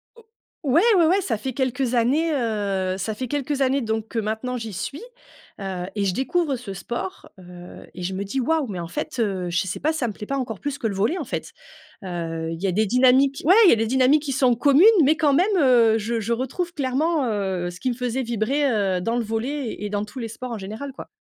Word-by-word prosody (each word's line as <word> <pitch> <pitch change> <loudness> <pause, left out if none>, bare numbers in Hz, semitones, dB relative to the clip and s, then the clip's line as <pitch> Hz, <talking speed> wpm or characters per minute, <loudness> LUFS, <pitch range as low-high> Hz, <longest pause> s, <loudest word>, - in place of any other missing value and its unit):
O 465 - -17 0.5
ouais, 320 +6 +5 0.2
ouais, 340 - +5
ouais, 370 +5 +3
ça 235 - -1
fait 260 +5 -5
quelques 255 -1 -1
années, 285 +8 +2
heu, 200 -7 -1
ça 195 +3 -3
fait 255 +4 -4
quelques 285 +1 -2
années 270 +1 +2
donc 220 -1 -2
que 230 - -2
maintenant 220 +4 -3
j'y 225 -3 -6
suis, 240 - -5 0.6
heu 185 -2 -4
et 205 - 0
je 190 - +1
découvre 280 - 0
ce 230 -5 -7
sport, 190 0 -6
heu 180 -1 -12
et 180 - -7
je 185 +2 -3
me 190 +1 -3
dis: 200 +7 -3
«Waouh! 315 +2 +1
Mais 190 -5 -5
en 170 - -5
fait, 280 +2 -5
heu, 190 -5 -1
je 170 0 0
sais 185 - -4
pas, 310 +3 +1
si 320 - -4
ça 245 - 0
me 215 - -4
plaît 210 - -9
pas 275 - -1
encore 230 -6 -4
plus 285 -1 -4
que 230 - -2
le 200 - -3
volley, 215 - +1
en - - -3
fait», - - -5 0.5
heu, 165 -3 -4
il 165 0 -6
y 195 - 0
a - - +1
des 215 +4 +2
dynamiques 260 +4 +3
ouais, 350 - +7
il - - +8
y - - +7
a - - +5
des 225 - 0
dynamiques 265 +5 +3
qui 285 - -3
sont 255 -2 +3
communes 280 +6 +4 0.2
mais 295 +3 +4
quand 295 -3 +3
même, 380 +8 +3
heu, 240 -7 +5
je 225 +2 -2
je 225 +2 -1
retrouve 270 +9 -3
clairement, 290 +2 0
heu, 190 -4 -2
ce 175 - -12
qui 255 - -1
me 240 - -4
faisait 250 +1 -2
vibrer, 240 +5 0
heu, 200 -6 +1
dans 230 +6 -1
le 240 - 0
volley 230 +4 -3
et 210 - -4
dans 205 0 -1
tous 210 +5 -10
les 230 - -3
sports 250 +3 -7
en 230 - -3
général, 215 +8 -6
quoi. - - -10
235 Hz, 255 wpm, -23 LUFS, 205-275 Hz, 0.6 s, il